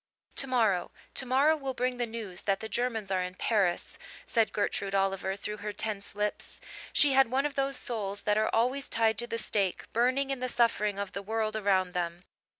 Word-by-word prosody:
"Tomorrow 225 Hz, -9 st, +2 dB, 0.2 s
tomorrow 270 Hz, +4 st, +3 dB
will 270 Hz, -4 st, -4 dB
bring 250 Hz, 0 st, -1 dB
the 240 Hz, -1 st, -1 dB
news 220 Hz, -5 st, -6 dB
that 195 Hz, -1 st, 0 dB
the 220 Hz, -, -5 dB
Germans 225 Hz, -2 st, -1 dB
are 185 Hz, -1 st, +2 dB
in 180 Hz, 0 st, -4 dB
Paris," 195 Hz, -4 st, 0 dB, 0.3 s
said 225 Hz, -2 st, +2 dB
Gertrude 200 Hz, -1 st, -1 dB
Oliver, 195 Hz, 0 st, 0 dB
through 210 Hz, +1 st, -5 dB
her 210 Hz, 0 st, -4 dB
tense 205 Hz, -1 st, -1 dB
lips. 210 Hz, 0 st, -1 dB, 0.3 s
She 285 Hz, -2 st, +4 dB
had 270 Hz, -2 st, +5 dB
one 265 Hz, +3 st, +1 dB
of 295 Hz, -, -1 dB
those 275 Hz, -1 st, 0 dB
souls 205 Hz, -4 st, -3 dB
that 210 Hz, -, +2 dB
are 215 Hz, 0 st, +2 dB
always 255 Hz, +5 st, +1 dB
tied 225 Hz, -1 st, +2 dB
to 240 Hz, -, -4 dB
the 230 Hz, -, -3 dB
stake, 200 Hz, -4 st, +1 dB
burning 255 Hz, +4 st, +2 dB
in 270 Hz, -, -2 dB
the 255 Hz, 0 st, -2 dB
suffering 210 Hz, -4 st, +2 dB
of 200 Hz, -1 st, -3 dB
the 200 Hz, -, -5 dB
world 220 Hz, +1 st, -1 dB
around 195 Hz, -4 st, +2 dB
them. 175 Hz, -1 st, -3 dB
220 Hz, 195 wpm, -30 LUFS, 200-250 Hz, 0.3 s, had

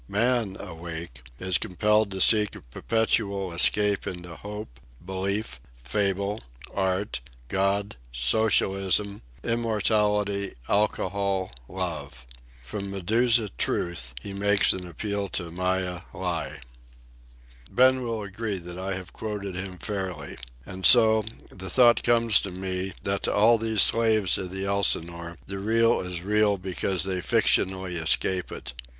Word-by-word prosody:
Man, 110 Hz, -2 st, +1 dB
awake, 85 Hz, -7 st, -8 dB, 0.2 s
is 95 Hz, -1 st, 0 dB
compelled 105 Hz, +3 st, +1 dB
to 95 Hz, -1 st, -4 dB
seek 105 Hz, 0 st, +5 dB
a -, -, -11 dB
perpetual 100 Hz, -, -1 dB
escape 100 Hz, +3 st, +3 dB
into 90 Hz, -2 st, -7 dB
Hope, 100 Hz, -, -8 dB, 0.3 s
Belief, 95 Hz, -, -3 dB, 0.2 s
Fable, 100 Hz, -, -1 dB, 0.3 s
Art, 95 Hz, -5 st, -1 dB, 0.3 s
God, 100 Hz, -2 st, 0 dB
Socialism, 95 Hz, -, +1 dB, 0.2 s
Immortality, 105 Hz, -3 st, 0 dB
Alcohol, 100 Hz, -2 st, 0 dB, 0.2 s
Love. 75 Hz, -9 st, -5 dB, 0.4 s
From 100 Hz, -, -5 dB
Medusa 110 Hz, +4 st, +2 dB
Truth 65 Hz, -8 st, -1 dB
he 100 Hz, +10 st, -8 dB
makes 100 Hz, +1 st, +3 dB
an 90 Hz, -1 st, -6 dB
appeal 100 Hz, +4 st, -3 dB
to 85 Hz, -3 st, -2 dB
Maya 90 Hz, 0 st, -1 dB
Lie." 90 Hz, -7 st, -4 dB, 1.1 s
Ben 130 Hz, +1 st, +4 dB
will 115 Hz, -3 st, -3 dB
agree 100 Hz, +1 st, -4 dB
that 90 Hz, 0 st, -6 dB
I 95 Hz, 0 st, -2 dB
have 90 Hz, -1 st, -8 dB
quoted 105 Hz, -3 st, -5 dB
him 90 Hz, 0 st, -6 dB
fairly. 95 Hz, -2 st, -5 dB, 0.3 s
And 95 Hz, 0 st, -8 dB
so, 110 Hz, +1 st, +7 dB, 0.3 s
the 95 Hz, 0 st, -7 dB
thought 120 Hz, +4 st, +5 dB
comes 115 Hz, -2 st, +4 dB
to 100 Hz, -, -5 dB
me, 95 Hz, +1 st, -4 dB
that 100 Hz, 0 st, -1 dB
to -, -, 0 dB
all 115 Hz, +3 st, +5 dB
these 110 Hz, -2 st, +3 dB
slaves 110 Hz, -5 st, +3 dB
of 95 Hz, -2 st, -5 dB
the 95 Hz, +1 st, -4 dB
Elsinore 85 Hz, -4 st, 0 dB
the 100 Hz, 0 st, -6 dB
Real 115 Hz, +3 st, +3 dB
is 90 Hz, -1 st, -5 dB
real 105 Hz, 0 st, +2 dB
because 95 Hz, -1 st, -1 dB
they 95 Hz, -1 st, -2 dB
fictionally 95 Hz, -1 st, +1 dB
escape 90 Hz, +3 st, +1 dB
it. -, -, -7 dB
100 Hz, 130 wpm, -26 LUFS, 90-105 Hz, 1.1 s, so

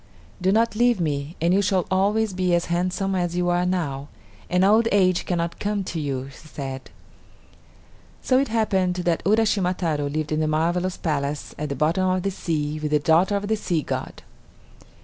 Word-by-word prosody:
"Do 185 Hz, +1 st, +3 dB
not 225 Hz, +2 st, +2 dB
leave 240 Hz, -1 st, +3 dB
me, 150 Hz, -1 st, -2 dB
and 170 Hz, +2 st, +2 dB
you 200 Hz, -, +4 dB
shall 190 Hz, -2 st, +1 dB
always 205 Hz, +2 st, +1 dB
be 180 Hz, -1 st, +1 dB
as 170 Hz, -, 0 dB
handsome 185 Hz, +2 st, -1 dB
as 175 Hz, -2 st, -1 dB
you 180 Hz, 0 st, +1 dB
are 175 Hz, +1 st, +1 dB
now, 145 Hz, -7 st, -2 dB, 0.4 s
and 180 Hz, +1 st, +3 dB
old 220 Hz, +3 st, +4 dB
age 185 Hz, -3 st, +2 dB
cannot 170 Hz, -1 st, -2 dB
come 205 Hz, -1 st, -1 dB
to 170 Hz, -, -4 dB
you," 135 Hz, -3 st, -3 dB
she 155 Hz, -, -15 dB
said. 135 Hz, -3 st, -7 dB, 1.3 s
So 255 Hz, 0 st, +2 dB
it 275 Hz, -, +1 dB
happened 195 Hz, -5 st, +1 dB
that 175 Hz, -2 st, 0 dB
Uraschima 205 Hz, -4 st, +2 dB
Taro 150 Hz, -5 st, -1 dB
lived 155 Hz, +1 st, -3 dB
in 155 Hz, -, +1 dB
the 155 Hz, -, +1 dB
marvelous 175 Hz, +4 st, 0 dB
palace 145 Hz, -2 st, -2 dB
at 150 Hz, 0 st, -3 dB
the 140 Hz, -, -2 dB
bottom 170 Hz, +7 st, +1 dB
of 185 Hz, -1 st, 0 dB
the 195 Hz, -, 0 dB
sea 155 Hz, -4 st, -2 dB
with 150 Hz, 0 st, -2 dB
the 150 Hz, -, +3 dB
daughter 165 Hz, +7 st, +3 dB
of 200 Hz, 0 st, -2 dB
the 220 Hz, -, +1 dB
sea 175 Hz, -7 st, -1 dB
god. -, -, -5 dB
180 Hz, 190 wpm, -23 LUFS, 155-195 Hz, 1.3 s, you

